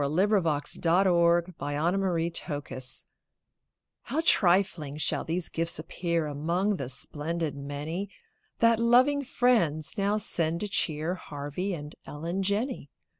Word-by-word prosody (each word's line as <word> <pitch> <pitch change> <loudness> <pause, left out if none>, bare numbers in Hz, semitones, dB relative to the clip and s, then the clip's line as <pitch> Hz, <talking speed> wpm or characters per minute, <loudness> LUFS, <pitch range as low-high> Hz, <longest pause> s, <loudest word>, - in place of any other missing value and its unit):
WITH - - +1
TWO 150 - -3 0.5
SPOONS - - -7 0.2
FOR 170 -2 +4
TWO 170 +2 -1
SPOONS 130 -6 -3 1.0
How 300 - -3
trifling 175 - +3
shall 155 - 0
these 170 +1 -2
gifts 165 +1 -1
appear 170 +1 -2
Among 170 +8 0
the 135 -5 -4
splendid 155 +3 -3
many 145 +7 -4 0.5
That 230 -1 +4
loving 255 +5 +4
friends 175 - +1
now 200 +2 +2
send 170 -5 0
to 210 - -1
cheer 165 -4 0
Harvey 155 +3 -4
and 150 -1 -8
Ellen 170 +6 -3
Jenney. 205 - -1
170 Hz, 125 wpm, -28 LUFS, 150-195 Hz, 1.0 s, FOR